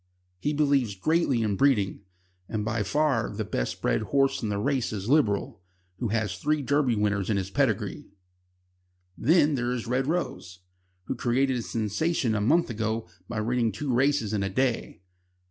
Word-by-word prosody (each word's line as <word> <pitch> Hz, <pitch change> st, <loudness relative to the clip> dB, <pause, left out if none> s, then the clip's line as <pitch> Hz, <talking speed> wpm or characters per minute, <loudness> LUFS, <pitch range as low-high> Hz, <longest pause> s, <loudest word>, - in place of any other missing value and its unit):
He 145 Hz, -, -1 dB
believes 140 Hz, -8 st, +2 dB
greatly 140 Hz, -, +1 dB
in 105 Hz, -2 st, 0 dB
breeding, 105 Hz, -6 st, +2 dB, 0.5 s
and 105 Hz, -2 st, -2 dB
by 110 Hz, 0 st, -1 dB
far 135 Hz, +2 st, +1 dB
the 110 Hz, +1 st, -4 dB
best -, -, -3 dB
bred -, -, +2 dB
horse 135 Hz, +4 st, +1 dB
in 110 Hz, -, -2 dB
the 100 Hz, -, -1 dB
race 130 Hz, +4 st, 0 dB
is 100 Hz, -2 st, -4 dB
Liberal, 115 Hz, -, +1 dB, 0.4 s
who 120 Hz, -, -1 dB
has 105 Hz, -4 st, -1 dB
three 150 Hz, +4 st, 0 dB
Derby 140 Hz, -3 st, +2 dB
winners 105 Hz, -1 st, 0 dB
in 105 Hz, -, +2 dB
his 95 Hz, 0 st, -3 dB
pedigree. -, -, 0 dB, 1.1 s
Then 155 Hz, +2 st, +3 dB
there 120 Hz, -2 st, -1 dB
is 125 Hz, -2 st, -3 dB
Red 125 Hz, +3 st, 0 dB
Rose, 120 Hz, -, -3 dB, 0.4 s
who -, -, -3 dB
created 130 Hz, +2 st, +1 dB
a -, -, -2 dB
sensation 115 Hz, -, -1 dB
a 105 Hz, -, 0 dB
month 155 Hz, +6 st, +3 dB
ago 110 Hz, -1 st, -2 dB, 0.2 s
by 110 Hz, -2 st, -2 dB
winning 115 Hz, 0 st, +1 dB
two 130 Hz, +6 st, -3 dB
races 130 Hz, -4 st, +2 dB
in 105 Hz, -, 0 dB
a 95 Hz, -, -1 dB
day. 120 Hz, -1 st, -1 dB
115 Hz, 170 wpm, -27 LUFS, 105-140 Hz, 1.1 s, Then